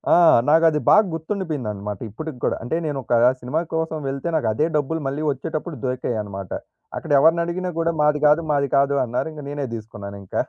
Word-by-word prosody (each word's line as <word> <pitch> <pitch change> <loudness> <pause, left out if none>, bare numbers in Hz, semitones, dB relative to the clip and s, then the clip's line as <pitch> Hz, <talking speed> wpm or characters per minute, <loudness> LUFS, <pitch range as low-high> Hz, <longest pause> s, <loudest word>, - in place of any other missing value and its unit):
ఆ! - - +6 0.3
నాకు 165 +2 +5
అది 150 -1 0
బాగా 215 +1 +7
గుర్తుండిపోయిందనమాట 145 - -4
ఇప్పటికి 155 +6 -7
గూడా. - - +1
అంటే, 120 +7 -2
నేనొకా 135 -5 0 0.2
సినిమా 135 +7 -1
కోసం 160 0 -1
వెళ్తే, 135 +4 -4
నాకదే 150 0 +1
డబ్బులు 155 +3 -1
మళ్ళీ 140 +3 -3
ఒచ్చేటప్పుడు 155 +3 -5
దొరికాయనమాట. 105 -7 -3 0.5
అక్కడ - - -6
ఎవరినడిగినా 170 +4 +2
గూడా 165 0 +1
మాది 150 0 +2
గాదు, 150 +3 +4
మాది 140 -1 +1
కాదు 140 +1 +3
అన్నారు. 125 +5 -2
ఇంక 150 -1 -9
నేనే 145 -1 -3
దీసుకున్నానింక. 100 -3 -9
145 Hz, 160 wpm, -22 LUFS, 120-160 Hz, 0.5 s, బాగా